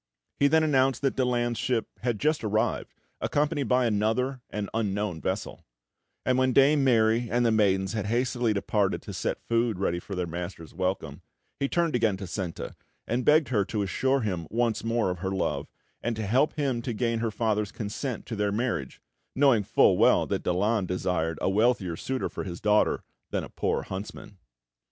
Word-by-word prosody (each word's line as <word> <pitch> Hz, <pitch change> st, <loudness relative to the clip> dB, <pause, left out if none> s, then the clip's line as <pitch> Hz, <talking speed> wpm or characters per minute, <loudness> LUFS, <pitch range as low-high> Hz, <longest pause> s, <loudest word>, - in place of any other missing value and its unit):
He 140 Hz, -, +5 dB
then 160 Hz, +2 st, +4 dB
announced 135 Hz, -3 st, +2 dB
that 135 Hz, -, +1 dB
Daland's 120 Hz, -2 st, 0 dB
ship 120 Hz, -3 st, 0 dB
had 120 Hz, -3 st, -1 dB
just 155 Hz, -3 st, +1 dB
arrived, 110 Hz, 0 st, -1 dB, 0.2 s
accompanied 145 Hz, -2 st, 0 dB
by 125 Hz, +1 st, +3 dB
another 115 Hz, +4 st, 0 dB
and 105 Hz, -1 st, -3 dB
unknown 105 Hz, -5 st, -1 dB
vessel; 95 Hz, +2 st, -3 dB, 0.6 s
and 130 Hz, 0 st, +2 dB
when 130 Hz, 0 st, +2 dB
Dame 140 Hz, +2 st, +5 dB
Mary 115 Hz, -2 st, +3 dB
and 120 Hz, +1 st, +2 dB
the 115 Hz, -, +4 dB
maidens 95 Hz, -2 st, +2 dB
had 105 Hz, -2 st, -2 dB
hastily 120 Hz, 0 st, +1 dB
departed 100 Hz, -1 st, 0 dB
to -, -, -7 dB
set -, -, -3 dB
food 115 Hz, -3 st, +1 dB
ready 85 Hz, -2 st, 0 dB
for 100 Hz, +2 st, -7 dB
their 90 Hz, -1 st, -1 dB
master's 85 Hz, -1 st, -6 dB
welcome, 90 Hz, -5 st, -3 dB, 0.4 s
he 140 Hz, -, 0 dB
turned 170 Hz, -5 st, +1 dB
again 110 Hz, -5 st, +2 dB
to 95 Hz, -, -6 dB
Senta, 90 Hz, -1 st, -5 dB, 0.3 s
and 120 Hz, +3 st, -1 dB
begged 150 Hz, +2 st, +4 dB
her 105 Hz, -6 st, +2 dB
to 105 Hz, 0 st, -2 dB
assure 130 Hz, +7 st, +1 dB
him 90 Hz, -7 st, -2 dB
once 115 Hz, -1 st, 0 dB
more 115 Hz, -4 st, +1 dB
of 90 Hz, -, -5 dB
her 95 Hz, +1 st, -2 dB
love, 95 Hz, -, -1 dB, 0.3 s
and 120 Hz, -1 st, -1 dB
to 110 Hz, -1 st, -3 dB
help 130 Hz, +9 st, +2 dB
him 135 Hz, -5 st, -1 dB
to 120 Hz, 0 st, -3 dB
gain 115 Hz, 0 st, 0 dB
her 115 Hz, 0 st, 0 dB
father's 105 Hz, -1 st, -1 dB
consent 115 Hz, +4 st, -4 dB
to 115 Hz, -, -5 dB
their 105 Hz, -1 st, 0 dB
marriage, 105 Hz, -, -2 dB, 0.4 s
knowing 135 Hz, -5 st, +4 dB
full 100 Hz, -, +3 dB
well -, -, +5 dB
that -, -, -2 dB
Daland 100 Hz, +3 st, +1 dB
desired 85 Hz, -3 st, -1 dB
a -, -, +2 dB
wealthier 105 Hz, -4 st, +2 dB
suitor 130 Hz, +8 st, -2 dB
for -, -, -6 dB
his 85 Hz, -3 st, -6 dB
daughter 105 Hz, 0 st, +2 dB, 0.3 s
than -, -, -2 dB
a -, -, -8 dB
poor -, -, -1 dB
huntsman. 95 Hz, 0 st, -8 dB
110 Hz, 185 wpm, -27 LUFS, 100-125 Hz, 0.6 s, He